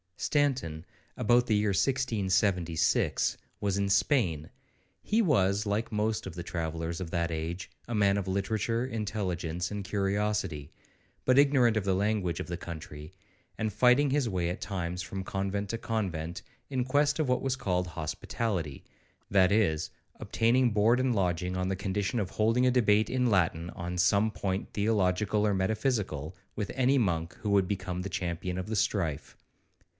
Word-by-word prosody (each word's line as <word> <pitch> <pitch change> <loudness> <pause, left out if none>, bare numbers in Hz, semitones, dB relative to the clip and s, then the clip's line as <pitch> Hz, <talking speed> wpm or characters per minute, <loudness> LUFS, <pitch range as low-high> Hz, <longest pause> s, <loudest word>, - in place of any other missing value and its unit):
Stanton, 130 - 0 0.3
about 120 +3 +3
the 110 - +2
year 105 0 +2
1676, 95 - +1 0.2
was 100 -2 0
in 100 0 0
Spain; 95 - +2 0.5
he 215 - +1
was, 105 - +2
like 105 +3 -1
most 110 0 -1
of 90 - -8
the 85 - -4
travellers 80 -1 -3
of 85 - -4
that 85 -1 0
age, 80 +3 -4 0.2
a 120 - -3
man 100 -1 +3
of 100 -2 -3
literature, 110 +5 -1
intelligence, 90 -7 -3
and 105 -1 -4
curiosity, 100 -6 -1 0.5
but 130 +1 +5
ignorant 130 -6 +4
of 105 - -1
the 95 -1 +2
language 100 -4 0
of - - -4
the 85 - -4
country, 75 -2 -8 0.5
and 110 -2 -2
fighting 125 +6 +4
his 135 -3 +1
way 90 -4 -1
at 90 - -5
times 90 -3 -3
from 95 +1 -5
convent 100 +2 -2
to 115 - -2
convent, 90 -7 -3 0.3
in 130 -3 0
quest 145 +3 +2
of 155 - +1
what 125 - +2
was 135 -1 0
called 90 -7 -1
'Hospitality,' 85 0 -3 0.5
that 95 -1 +4
is, 95 -8 +2 0.3
obtaining 120 +2 +2
board 110 +4 +3
and 130 -2 +1
lodging 90 -1 0
on 90 0 -1
the 95 - 0
condition 100 +4 -1
of 95 -4 -2
holding 115 +4 +2
a 125 - +4
debate 110 -4 +3
in 125 -1 +1
Latin, 85 -4 +1
on 90 +1 -5
some 100 +4 +3
point 95 -1 -3
theological 105 0 +1
or 105 - +2
metaphysical, 95 - -1 0.2
with 105 -2 -3
any 130 +1 +3
monk 85 -6 -1
who 105 - -1
would 100 -2 +3
become 90 -2 -3
the 100 - -4
champion 90 -1 -3
of 90 - -5
the 110 - -2
strife. 85 -8 -1
100 Hz, 165 wpm, -29 LUFS, 90-110 Hz, 0.5 s, but